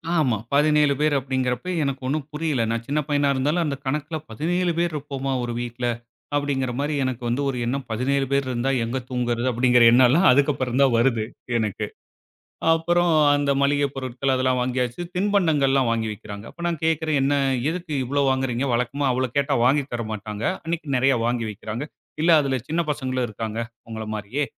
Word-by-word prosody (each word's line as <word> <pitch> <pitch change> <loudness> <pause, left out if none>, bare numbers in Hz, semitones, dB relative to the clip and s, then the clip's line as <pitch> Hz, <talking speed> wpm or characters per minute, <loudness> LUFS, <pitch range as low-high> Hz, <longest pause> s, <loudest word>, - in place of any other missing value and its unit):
ஆமா, 130 -9 +2 0.2
17 150 0 +4
பேரு 150 0 +2
அப்பிடிங்கிறப்ப 130 +2 -2
எனக்கு 140 -1 -2
ஒன்னும் 145 +1 -2
புரியல. 150 -4 -1
நான் 115 0 -2
சின்ன 145 +2 0
பையனா 145 -1 +2
இருந்தாலும் 150 +6 +1
அந்த 145 -2 -1
கணக்குல 150 +4 -2
17 175 +9 0
பேரு 170 0 +1
இருப்போமா! 135 -2 -4
ஒரு 120 0 -3
வீட்ல. 120 0 -4 0.5
அப்பிடிங்கிறமாரி 140 0 -1
எனக்கு 130 -2 -3
வந்து 120 +4 0
ஒரு 130 - -3
எண்ணம் 130 +2 -2
17 135 +4 0
பேரு 140 0 +2
இருந்தா 125 +2 0
எங்க 115 +3 -2
தூங்குறது 120 -1 -1
அப்பிடிங்கிற 125 0 +4
எண்ணலாம் 130 +9 +5
அதுக்கப்பறந்தான் 135 -1 +2
வருது 115 -2 +2 0.3
எனக்கு, 110 -4 -2 0.9
அப்பறம் 175 +1 +2 0.2
அந்த 145 -1 +1
மளிகைப் 140 0 +1
பொருட்கள் 130 0 -2
அதெல்லாம் 130 -1 +1
வாங்கியாச்சு. 125 +1 -1 0.2
தின்பண்டங்கள்லாம் 155 - +2
வாங்கி 115 -1 0
வைக்கிறாங்க. 100 0 -9
அப்ப 170 - -9
நான் 165 -4 -3
கேட்கிறேன் 160 -2 +1
"என்ன? 140 +2 +2 0.4
எதுக்கு 170 -2 -4
இவ்ளோ 140 +3 0
வாங்குகிறீங்க?" 130 -1 0
வழக்கமா 130 +4 -1
அவ்ள 130 +1 0
கேட்டா 140 0 +2
வாங்கி 140 +3 +3
தரமாட்டாங்க. 110 -2 -5 0.2
அன்னக்கி 165 -2 -3
நெறையா 130 0 +3
வாங்கி 120 -1 -1
வைக்கிறாங்க. 110 +6 -6 0.4
இல்ல 170 - +4
அதுல 135 -2 0
சின்ன 165 +2 0
பசங்களும் 130 -3 -1
இருக்காங்க 110 +1 -5 0.3
உங்கள 110 -1 -5
மாரியே! 110 +8 -2
135 Hz, 160 wpm, -23 LUFS, 120-145 Hz, 0.9 s, எண்ணலாம்